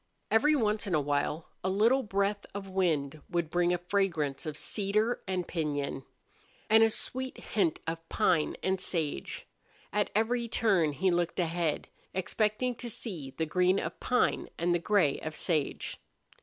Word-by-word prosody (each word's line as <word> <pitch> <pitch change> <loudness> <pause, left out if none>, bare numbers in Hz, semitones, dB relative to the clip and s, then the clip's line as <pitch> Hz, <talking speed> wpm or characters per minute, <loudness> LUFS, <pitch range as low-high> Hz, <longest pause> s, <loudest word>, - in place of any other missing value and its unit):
Every 300 +7 +5
once 215 -4 +1
in 180 - +1
a - - +4
while 145 +2 -1 0.2
a 190 - +1
little 225 +8 +4
breath 200 -2 0
of 195 -1 -6
wind 155 -6 0
would 170 -2 -1
bring 175 0 +3
a 180 - +2
fragrance 175 -7 -1
of 150 -1 -4
cedar 215 +3 0
and 185 -2 -1
piñon, 145 -5 -2 0.7
and 220 0 +8
a 225 - +6
sweet 260 +4 -3
hint 190 -7 0
of 165 0 -5
pine 180 -8 +2
and 190 0 +1
sage. 155 - -3 0.5
At 210 0 +2
every 235 +2 +1
turn 195 -10 +2
he 185 +6 +2
looked 175 0 0
ahead, 165 -2 0 0.3
expecting 215 +6 0
to 240 - -5
see 165 - -6
the 160 - +1
green 180 +4 +3
of - - -5
pine 250 0 +1
and 175 +1 +2
the 175 - +2
gray 175 -6 +2
of 155 0 -5
sage. 155 -6 -1
185 Hz, 160 wpm, -30 LUFS, 160-210 Hz, 0.7 s, and